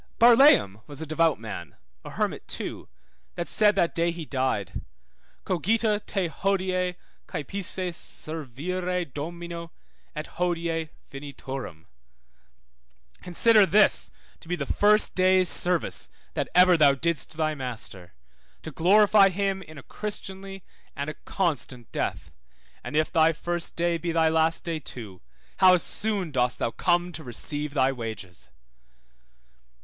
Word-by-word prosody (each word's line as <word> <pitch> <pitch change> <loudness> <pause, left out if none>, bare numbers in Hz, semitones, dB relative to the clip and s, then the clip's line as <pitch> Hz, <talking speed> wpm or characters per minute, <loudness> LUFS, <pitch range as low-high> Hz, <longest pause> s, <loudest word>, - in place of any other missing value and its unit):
Barlaam 230 - +6
was 145 -2 -9
a 160 - -5
devout 160 -2 +1
man 95 -9 -8 0.3
(a - - -8
hermit - - -3
too) - - -4 0.5
that 170 - -3
said 210 -1 +4
that 170 - +1
day 170 +1 +1
he 170 -1 -5
died, 130 -9 -2 0.6
Cogita 210 +4 +1
te 195 -3 -1
hodie 185 0 -1 0.3
caepisse 185 +3 -3
servire 170 +6 -4
Domino, 170 +3 -7 0.4
et 155 +1 -4
hodie 170 -2 -1 0.2
finiturum, 135 - -8 1.4
Consider 205 +3 +4
this 210 +2 +4 0.3
to - - -16
be 180 - -1
the 145 -5 -4
first 210 +7 +3
day's 185 0 +4
service 175 -1 +1 0.2
that - - -2
ever 180 0 +7
thou 145 -3 +5
didst 160 +1 -1
thy 155 -1 0
Master, 110 - -6 0.5
to 160 - -7
glorify 200 +5 +5
him 195 +1 -1
in 155 -4 -12
a 140 - -10
Christianly 195 -2 -6 0.3
and 140 +1 -3
a - - -13
constant 135 - -2
death, - - -3 0.5
and - - -6
if 155 0 +1
thy 160 -1 +4
first 175 +2 -2
day 170 0 0
be 170 +1 -2
thy 165 -1 +3
last 160 0 +1
day 165 -2 -3
too, 110 -10 -9 0.4
how 185 -1 +7
soon 195 0 -2
dost 125 -3 +1
thou 115 - -1
come 175 +4 +1
to 160 -2 -6
receive 145 +4 -4
thy 135 -1 +3
wages! 110 -8 -7
165 Hz, 135 wpm, -26 LUFS, 140-185 Hz, 1.4 s, ever